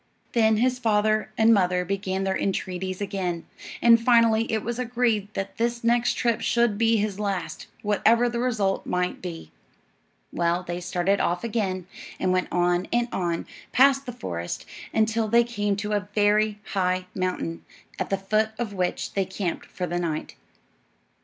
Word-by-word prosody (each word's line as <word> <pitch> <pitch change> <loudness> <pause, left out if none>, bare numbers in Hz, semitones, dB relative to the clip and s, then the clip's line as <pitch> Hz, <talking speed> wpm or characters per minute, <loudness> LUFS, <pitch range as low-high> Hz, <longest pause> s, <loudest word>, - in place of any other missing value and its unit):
Then 220 -2 +4
his 250 +2 +1
father 215 -2 +1
and 225 +1 +6
mother 180 -3 +2
began 195 0 -2
their 190 0 0
entreaties 185 -1 -2
again, 190 -4 -3 0.4
and 230 -1 +7
finally 230 -1 +4
it 220 -1 0
was 235 +1 -3
agreed 230 -4 0
that 195 - -4
this 235 0 -1
next 235 +1 +2
trip 235 -3 0
should 235 -3 +2
be 225 0 +4
his 210 -1 -1
last, 190 -6 -3 0.2
whatever 225 +3 +3
the 235 0 -2
result 215 -6 0
might 180 0 -1
be. 165 - -7 0.8
Well, 170 +1 +1
they 175 0 -4
started 180 +2 0
off 175 +3 0
again, 200 -6 -2 0.3
and 185 - +1
went 185 0 +1
on 175 +1 +1
and 240 0 +1
on, 170 -2 -1 0.3
past 275 +1 +4
the - - -3
forest, 85 - -5 0.3
until 220 0 +1
they 235 +2 +5
came 210 -4 -1
to 210 +1 -4
a 205 -1 -1
very 210 0 +3 0.2
high 185 -1 +1
mountain, 185 -3 -3 0.4
at - - -2
the 195 - +1
foot 215 +3 +1
of 225 -4 -3
which 180 -2 -2
they 195 -1 +1
camped 190 -2 -4
for 180 - -4
the 175 0 -2
night. 160 -3 -3
205 Hz, 165 wpm, -25 LUFS, 185-230 Hz, 0.8 s, and